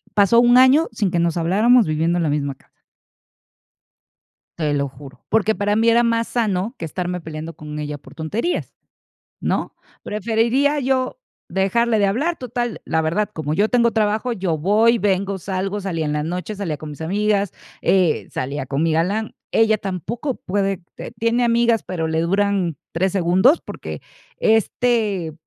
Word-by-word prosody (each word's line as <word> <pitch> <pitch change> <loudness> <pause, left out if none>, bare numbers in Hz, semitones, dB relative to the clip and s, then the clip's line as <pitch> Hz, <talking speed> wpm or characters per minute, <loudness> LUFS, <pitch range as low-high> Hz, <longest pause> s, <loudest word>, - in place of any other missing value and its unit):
pasó 205 +3 +5
un 240 +1 +6
año 260 +5 +6
sin 210 -4 -1
que 175 - 0
nos 170 0 +1
habláramos 215 +8 +4
viviendo 160 +2 0
en 175 - 0
la 155 - +1
misma 140 -2 -1
casa. - - -30 1.9
Te 150 -3 0
lo 140 -1 0
juro, 135 +1 -14
porque 220 0 +2
para 205 +1 0
mí 225 +1 +3
era 235 +1 +5
más 230 -1 +1
sano 215 -1 -1
que - - -5
estarme 180 +2 -3
peleando 160 +1 -7
con 150 0 -8
ella 150 -1 -4
por 140 0 -16
tonterías, 205 - -3 0.7
¿no? - - -2 0.3
Preferiría 235 +7 +1
yo 260 - -1 0.3
dejarle 220 +6 +1
de 205 - +3
hablar, 285 - 0
total, 240 -1 -4
la 160 - +1
verdad, 170 +7 0
como 155 -1 -3
yo 210 +5 +2
tengo 235 -2 +3
trabajo, 220 +2 0
yo 185 -6 -1
voy, 215 +8 +3
vengo, 195 -1 0
salgo, 195 +2 -3
salía 175 -5 -2
en 150 - -1
la 150 - 0
noche, 180 +6 -4
salía 180 -7 -3
con 155 +1 -8
mis 145 - -10
amigas, 200 +3 0 0.3
eh, 185 -5 +2
salía 135 +1 -4
con 140 +3 -1
mi 165 - +2
galán. 200 +7 0 0.2
Ella 220 -1 +3
tampoco 220 - -4
puede, 195 -1 -2 0.2
eh - - -7
tiene 230 +2 +1
amigas, 235 -1 +3
pero 165 -3 -3
le 160 0 0
duran 190 -2 0
3 185 +3 0
segundos, 190 - +3
porque, - - -8 0.4
este, 220 -5 +1
195 Hz, 165 wpm, -21 LUFS, 165-230 Hz, 1.9 s, un